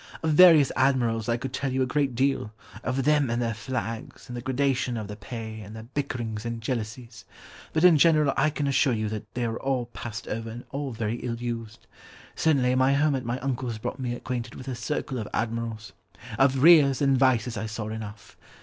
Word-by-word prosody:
Of 160 - +2
various 155 -3 +7
admirals 120 -4 +1
I 115 - +2
could 130 +1 -6
tell 135 -1 -2
you 130 0 +1
a - - +1
great 135 -1 0
deal; 130 -4 0 0.3
of 130 +1 -1
them 145 -2 +3
and 120 +1 0
their 115 -2 0
flags, 115 +1 -5
and 125 - -7
the 120 - -4
gradation 130 -1 0
of 110 - -4
their 105 - -7
pay, 110 +1 -7
and 105 +1 -10
their 110 - -8
bickerings 120 -7 -3
and 115 -1 -4
jealousies. 115 0 -5 0.5
But 160 - 0
in 175 -4 +7
general, 155 -2 +4
I 150 +3 +3
can 145 -1 -3
assure 140 -1 +2
you 110 -1 -2
that 110 -1 -6
they 120 -1 -1
are 115 0 -3
all 130 -2 -1
passed 115 -1 -6
over 115 +1 -4
and 120 +2 -8
all 140 -1 -3
very 115 0 -2
ill 120 -1 -3
used. 115 -2 -5 0.5
Certainly 135 -6 +2
my 130 +1 +3
home 145 +1 +3
at 130 -2 -2
my 120 +2 -1
uncle's 130 -4 -2
brought 110 - -5
me 125 -2 -2
acquainted 120 -1 -5
with 130 - -10
a 130 - -2
circle 130 0 -3
of 105 - -4
admirals. 115 -1 -3 0.5
Of 135 0 +3
Rears 150 -6 +7
and 135 -1 +3
Vices 125 -3 +2
I 110 +1 -3
saw 110 0 -5
enough. 110 -1 -8
125 Hz, 210 wpm, -26 LUFS, 115-135 Hz, 0.5 s, various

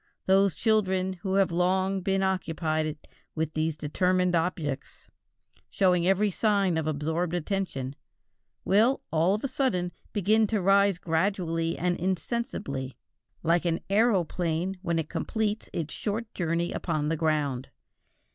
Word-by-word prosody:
Those 195 -3 +4
children 190 -4 +1
who 190 0 -1
have 195 -2 +3
long 185 +2 +1
been 195 +1 +1
occupied 155 -4 -1 0.3
with 160 0 -2
these 155 0 -1
determined 180 +4 +1
objects, 160 -5 -3 0.6
showing 180 -2 +2
every 200 +2 +3
sign 200 -3 +2
of 160 -1 -1
absorbed 160 +3 -1
attention, 165 -7 -3 0.7
will, 225 +7 +3
all 165 +5 +3
of 215 - -6
a - - +1
sudden, 250 -10 0 0.2
begin 215 +2 +3
to 215 0 0
rise 195 0 +4
gradually 165 -1 0
and 175 +1 0
insensibly, 170 - -3 0.5
like 170 +1 +2
an 170 -1 0
aeroplane 185 -4 +1
when 170 -3 -1
it 160 -2 -1
completes 220 +2 -2
its 160 -3 -4
short 220 +1 -3
journey 170 -1 -1
upon 155 -3 -1
the 165 - +1
ground. 150 -5 -1
180 Hz, 130 wpm, -27 LUFS, 160-195 Hz, 0.7 s, Those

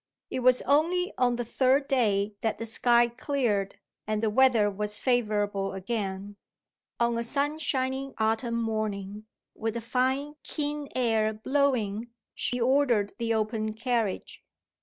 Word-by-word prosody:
It - - -2
was 255 0 +4
only 335 +6 +2
on 245 -1 +3
the 240 0 -3
third 265 +4 +2
day 215 -6 +1
that 225 - -1
the 230 - -4
sky 235 +1 +3
cleared, 235 -5 -1 0.3
and 215 0 -1
the 220 - +2
weather 240 -3 +4
was 210 +1 -1
favourable 205 -6 0
again. 195 0 -4 0.6
On 235 0 +1
a - - -1
sunshiny 275 -1 -1
autumn 225 +2 0
morning, 215 -2 -3 0.3
with 225 +1 -3
a - - -2
fine 260 +5 -1
keen 295 -1 -3
air 225 -3 +2
blowing, 240 -3 0 0.2
she 250 - -2
ordered 240 -5 +2
the 230 -1 0
open 215 0 -1
carriage. 230 -4 -2
235 Hz, 135 wpm, -28 LUFS, 215-260 Hz, 0.6 s, was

